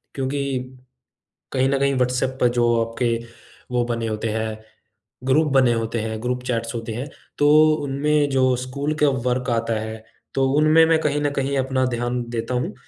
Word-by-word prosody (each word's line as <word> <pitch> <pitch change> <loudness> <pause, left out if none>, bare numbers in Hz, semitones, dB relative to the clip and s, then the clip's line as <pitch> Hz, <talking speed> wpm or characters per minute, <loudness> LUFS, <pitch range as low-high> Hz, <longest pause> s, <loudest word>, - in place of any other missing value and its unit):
क्योंकि 135 -1 -2 0.9
कहीं 130 0 +2
न 140 0 +1
कहीं 140 0 +2
व्हाट्सऐप 125 +1 0
पर 125 - +5
जो 120 - +4 0.2
आपके 115 +1 -1 0.6
वो 120 -1 +2
बने 115 -1 -2
होते 110 +1 -2
हैं, 110 0 -3 0.7
ग्रुप 150 +4 +3
बने 130 -3 +4
होते 115 0 -2
हैं, 110 0 -4
ग्रुप 125 0 -2
चैट्स 115 -1 -2
होते 115 -1 -4
हैं, 125 +5 -4 0.3
तो 145 0 +4 0.3
उनमें 145 +1 +1
जो 130 -2 +2
स्कूल 140 +4 -3
का 145 - +6 0.2
वर्क 125 +1 -1
आता 115 0 0
है, 110 0 -6 0.3
तो 135 0 +2
उनमें 155 +2 +5
मैं 160 0 +3
कहीं 145 -1 0
न 145 - +1
कहीं 140 0 -1
अपना 130 0 +1
ध्यान 120 +1 -2
देता 115 +1 -3
हूँ। 145 +11 -1
125 Hz, 175 wpm, -22 LUFS, 115-140 Hz, 0.9 s, का